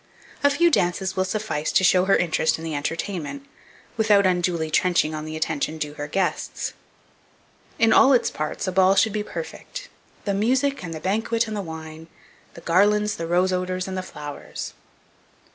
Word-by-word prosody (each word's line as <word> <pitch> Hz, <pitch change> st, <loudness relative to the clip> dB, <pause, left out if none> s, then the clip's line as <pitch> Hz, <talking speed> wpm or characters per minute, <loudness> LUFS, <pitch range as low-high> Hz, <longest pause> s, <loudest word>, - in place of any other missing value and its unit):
A 285 Hz, -, +6 dB
few 340 Hz, +4 st, +3 dB
dances 185 Hz, -, +1 dB
will 185 Hz, -, +1 dB
suffice 190 Hz, -6 st, -2 dB
to -, -, +3 dB
show 180 Hz, 0 st, +5 dB
her 195 Hz, -, +4 dB
interest 160 Hz, -2 st, +1 dB
in 160 Hz, -, -9 dB
the 165 Hz, -1 st, -4 dB
entertainment, 170 Hz, -, -4 dB, 0.5 s
without 210 Hz, -3 st, +4 dB
unduly 175 Hz, -3 st, +1 dB
trenching 170 Hz, -2 st, +2 dB
on 155 Hz, 0 st, -5 dB
the 155 Hz, 0 st, -5 dB
attention 155 Hz, 0 st, -2 dB
due 150 Hz, -1 st, -3 dB
to 150 Hz, -, -16 dB
her 145 Hz, -, -3 dB
guests. 190 Hz, +5 st, -2 dB, 1.0 s
In 225 Hz, 0 st, +4 dB
all 275 Hz, -, +7 dB
its 250 Hz, -, +3 dB
parts 155 Hz, +5 st, -4 dB
a -, -, 0 dB
ball 190 Hz, +1 st, +4 dB
should 220 Hz, 0 st, +3 dB
be 210 Hz, -, -1 dB
perfect, -, -, -7 dB, 0.4 s
"The 200 Hz, -, 0 dB
music, 260 Hz, +5 st, +1 dB
and 165 Hz, -, -5 dB
the -, -, -5 dB
banquet, 225 Hz, +6 st, 0 dB
and 215 Hz, -, -4 dB
the 205 Hz, -, -2 dB
wine; 160 Hz, -2 st, -8 dB, 0.5 s
The 170 Hz, -, -10 dB
garlands, 210 Hz, +5 st, +2 dB
the 165 Hz, -, -4 dB
rose 180 Hz, +2 st, +2 dB
odours, 185 Hz, 0 st, -2 dB
and 190 Hz, -, -4 dB
the 185 Hz, -, -2 dB
flowers." 150 Hz, -5 st, -7 dB
185 Hz, 180 wpm, -24 LUFS, 160-210 Hz, 1.0 s, all